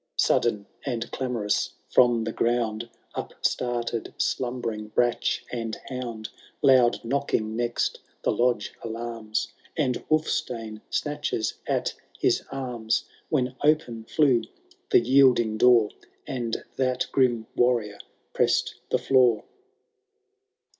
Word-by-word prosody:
Sudden 105 -4 +2 0.2
and 120 -4 -3
clamorous, 120 -6 -1 0.2
from 120 -2 +5
the 115 - -2
ground 115 -1 0 0.2
Upstarted 120 -2 -2
slumbering 120 -4 -2
brach 120 +2 +1
and 115 -2 -3
hound; 120 -4 -5 0.4
Loud 125 -4 +5
knocking 110 -4 0
next 120 0 -1 0.2
the - - +2
lodge 120 -4 +1
alarms. 115 -1 -3 0.2
And 130 -6 0
Wulfstane 125 -9 -1
snatches 145 -7 -1
at - - 0 0.2
his - - +2
arms, 125 -4 -1 0.2
When 130 -4 0
open 145 -7 +2
flew 135 -3 +3 0.5
the 380 - +6
yielding 125 -5 +4
door. 120 -4 +6 0.3
And 120 -3 -3
that 130 -1 +1
grim 120 -4 +2
Warrior 115 -5 +1 0.3
pressed - - +2 0.2
the - - +3
floor. 125 -5 +3
120 Hz, 105 wpm, -26 LUFS, 115-130 Hz, 0.5 s, the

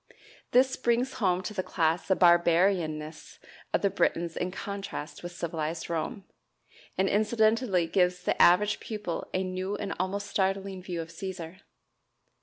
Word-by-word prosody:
This 260 +2 +3
brings 245 +1 +1
home 185 -2 +2
to 210 - -5
the 195 - -1
class 160 -2 0
the 190 - +3
"barbarianness" 170 -3 +2 0.3
of - - 0
the 200 - +3
Britons 170 0 0
in 180 - -2
contrast 195 -5 -6
with 175 - -6
civilized 165 -1 -4
Rome, 170 +4 -3 0.7
and 190 - +2
incidentally 215 -2 +2
gives 180 +1 +1
the - - +1
average 205 +4 +5
pupil 210 -6 -5
a 185 - 0
new 185 +2 -3
and 200 -1 -3
almost 195 +2 -2
startling 195 -1 -1
view 175 -2 -4
of 165 - -13
"Cæsar"! 180 0 -7
185 Hz, 145 wpm, -28 LUFS, 170-200 Hz, 0.7 s, average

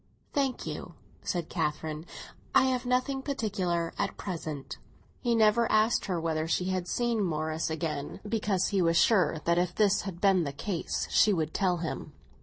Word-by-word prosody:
"Thank 275 -3 0
you," - - -6 0.3
said 175 -3 -2
Catherine; 155 0 -3 0.5
"I - - +7
have 255 -1 0
nothing 255 +2 +1
particular 185 - -1
at - - -1
present." 160 -7 -5 0.4
He 240 -2 +1
never 225 +1 +4
asked 215 +2 +3
her 180 -3 -1
whether 160 -1 -1
she 180 +2 0
had 185 -1 -1
seen 235 0 0
Morris 155 -2 -1
again, 155 -3 -3
because 205 -4 0
he 195 -3 +1
was 165 -1 +3
sure 180 -4 +3
that 170 +1 +3
if 180 0 -1
this 205 -2 +3
had 190 -3 -6
been 190 -3 +4
the 140 -2 -3
case 175 +4 -3
she 215 - +5
would 160 -4 -1
tell 185 -3 +1
him. 165 -1 -5
180 Hz, 170 wpm, -29 LUFS, 165-215 Hz, 0.5 s, I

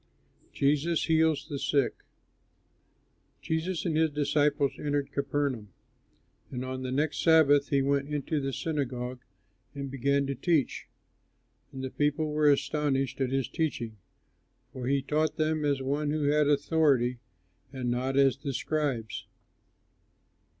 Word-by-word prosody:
JESUS 150 +4 +1
HEALS 160 -2 +2
THE 145 -3 -4
SICK 140 -3 +1 1.5
Jesus 160 +2 -2
and 165 -3 0
his 160 0 +3
disciples 145 -1 +1
entered 145 -1 -1
Capernaum; 140 -6 -2 0.8
and 125 0 -4
on 130 0 -4
the 130 -1 -4
next 150 +3 0
Sabbath 150 -4 +5
he 140 -2 +2
went 140 +1 0
into 150 +1 -1
the 135 0 -2
synagogue 130 -5 -3 0.6
and 140 -1 -5
began 140 +1 +1
to 140 - -2
teach. 155 +1 0 0.8
And 130 0 -7
the 130 - -4
people 150 +1 0
were 150 0 +3
astonished 140 -1 0
at 130 - +1
his 135 -1 0
teaching, 135 -9 -2 0.8
for 125 -1 -5
he 140 0 +1
taught 155 +2 0
them 155 0 0
as 140 -2 0
one 145 +2 -1
who 150 0 -1
had 150 +1 +3
authority, 140 -4 +2 0.5
and 130 -3 -2
not 130 +2 -1
as 135 -1 +4
the 140 -1 -4
scribes. 135 -6 -2
140 Hz, 135 wpm, -29 LUFS, 135-150 Hz, 1.5 s, Sabbath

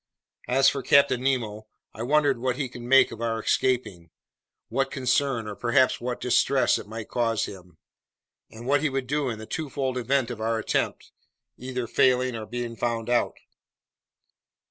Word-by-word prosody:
As 135 +2 +4
for 140 - +2
Captain 140 -2 +4
Nemo, 115 -5 -1 0.3
I 110 - -8
wondered 140 0 +2
what 130 0 -1
he 135 0 -2
would 120 - -8
make 135 +3 +5
of 115 - -8
our 115 -1 -1
escaping, 110 -8 0 0.6
what - - -1
concern 125 -2 0
or 105 - -5
perhaps 130 +3 +2
what 125 0 -3
distress 125 +2 +2
it - - -10
might 110 0 -7
cause 115 -3 0
him, 90 -4 -12 0.7
and 115 +2 -11
what 140 +2 +2
he 155 - +1
would 135 -1 -2
do 145 0 -1
in 115 - -4
the 110 - -8
twofold 135 -2 -3
event 125 0 0
of 115 -2 -7
our 115 +1 0
attempt 110 - -2 0.4
either 125 -1 -4
failing 125 +1 +2
or 110 -1 -6
being 120 0 -4
found 115 0 -2
out! 120 - +1
125 Hz, 165 wpm, -26 LUFS, 115-130 Hz, 0.7 s, make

